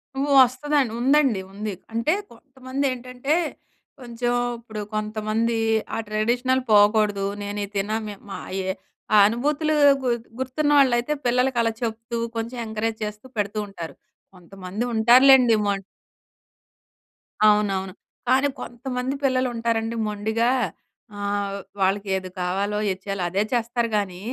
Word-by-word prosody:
హ్మ్. 275 - 0 0.2
వస్తుందండి. 260 0 0
ఉందండి. 270 -6 +3
ఉంది. 210 0 -4 0.2
అంటే, 230 +9 +1 0.2
కొంతమందేంటంటే, 260 +1 -3 0.6
కొంచం 240 0 -2 0.3
ఇప్పుడు 220 -2 -7
కొంతమందీ 215 +2 -1 0.4
ఆ - - -2
ట్రెడిషనల్ 245 +5 +1
పోకోడదు. 205 -1 +4 0.2
నేనీ 205 0 -3
తినా 205 +2 -1
మే 205 - -6
మా - - -5 0.3
ఏ - - -1 0.5
ఆ - - +8
అనుభూతులూ 295 +7 0 0.3
గు 250 - +1 0.3
గుర్తున్న 290 +3 0
వాళ్ళైతే 260 +1 +3
పిల్లలకలా 245 -2 +2
చెప్తూ, 230 +1 -3 0.2
కొంచం 230 +2 -4
ఎంకరేజ్ 220 +1 -2
చేస్తూ 210 +2 -6
పెడుతూ 205 +1 -1
ఉంటారు. 170 -5 -8 0.4
కొంతమంది 185 +4 -6
ఉంటారులెండి 245 +1 +6
మొ 200 - +2 1.8
అవునవును. 195 -3 +1 0.4
కానీ, 265 +2 +4
కొంతమంది 250 +2 -4
పిల్లలు 255 -1 +2
ఉంటారండి 230 0 -1
మొండిగా 220 +3 0 0.7
ఆహ్, 200 0 -2 0.2
వాళ్ళకేది 190 -1 0
కావాలో 195 +3 -1
ఏది 190 0 -2
చెయ్యాలో 195 -2 -2
అదే 195 +3 0
చేస్తారు 235 0 0
గానీ, 190 -3 -2
225 Hz, 115 wpm, -23 LUFS, 205-255 Hz, 1.8 s, ఆ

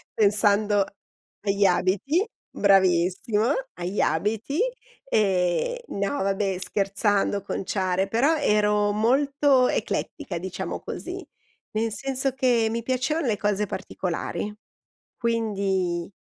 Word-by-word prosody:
pensando 205 -1 +3 0.6
agli 200 0 +1
abiti 200 - +2 0.2
bravissimo, 190 +2 +3 0.3
agli 180 +3 -4
abiti. 220 - 0 0.5
Ehm, 195 - +1
no, 200 +8 -2
vabbè, 195 -1 0
scherzando, 200 +2 +1
conciare, 190 -1 -1
però 260 +10 +2
ero 210 -5 +2
molto 270 +4 +3
eclettica, 275 - -3
diciamo 185 +2 -4
così. - - -6 0.5
Nel 220 +1 -1
senso 270 +4 -1
che 245 -4 +2
mi 230 0 -3
piacevano 260 +5 0
le 215 -3 +1
cose 210 0 0
particolari, 190 +2 -4 0.6
quindi 195 -7 -1
210 Hz, 95 wpm, -25 LUFS, 195-235 Hz, 0.6 s, pensando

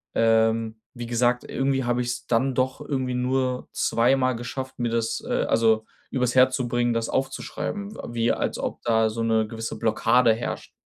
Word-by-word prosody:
ähm, 110 0 +2 0.2
wie 120 - -5
gesagt, 120 +1 +1
irgendwie 135 0 0
habe 120 0 0
ich's 120 0 -3
dann 125 +2 +1
doch 130 0 0
irgendwie 130 -3 -2
nur 125 0 -1
zweimal 130 +1 +2
geschafft, 130 +2 -6
mir 120 - 0
das 115 0 -1
äh, - - 0
also, 110 -1 +2 0.2
übers 125 -2 0
Herz 130 0 +5
zu 125 -3 -2
bringen, 120 0 +1
das 115 0 -1
aufzuschreiben, 200 +10 -3
w - - -12
wie 115 0 +2
als - - -2
ob - - -4
da 110 -1 +3
so 115 - -4
'ne 110 -1 +2
gewisse 115 0 -5
Blockade 115 +1 +3
herrscht. 115 - -5
120 Hz, 175 wpm, -25 LUFS, 115-130 Hz, 0.2 s, Herz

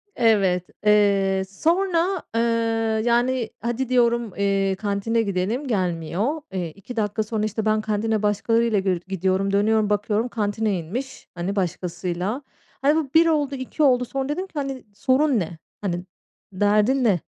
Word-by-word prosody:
Evet, 195 -6 +2 0.2
eee, 200 -2 +3
sonra, 345 - +1
ııı, 225 -1 +1
yani, 240 0 +1
"Hadi," 240 +2 -2
diyorum, 235 -4 +2
eee, 195 -1 +1
"kantine 205 +3 0
gidelim." 205 +7 -1
Gelmiyor. 185 - -1
Eee, 175 -3 -2
2 200 +7 -10
dakika 215 0 0
sonra, 215 0 -2
işte, 215 +1 -3
ben 215 0 +2
kantine 215 0 -1
başkalarıyla 220 +1 +2
gir 185 -3 0
gidiyorum, 190 +1 0
dönüyorum, 215 +1 +2
bakıyorum, 210 +3 0
kantine 210 -3 -1
inmiş, 245 +12 -6
hani, 180 +4 -3
başkasıyla. 180 - -2 0.4
Hani, 290 +3 +4
bu 310 -4 -1
1 330 +1 +6
oldu, 290 -3 +1
2 260 +4 -2
oldu, 250 -3 +4
sonra 270 +2 -3
dedim 370 +6 -2
ki: - - -32
"Hani, 275 -2 -3
sorun 265 +2 +2
ne? 165 -2 -4 0.2
Hani, 180 -2 -2 0.5
derdin 210 +7 +3
ne?" 195 -8 +2
215 Hz, 145 wpm, -23 LUFS, 195-250 Hz, 0.5 s, 1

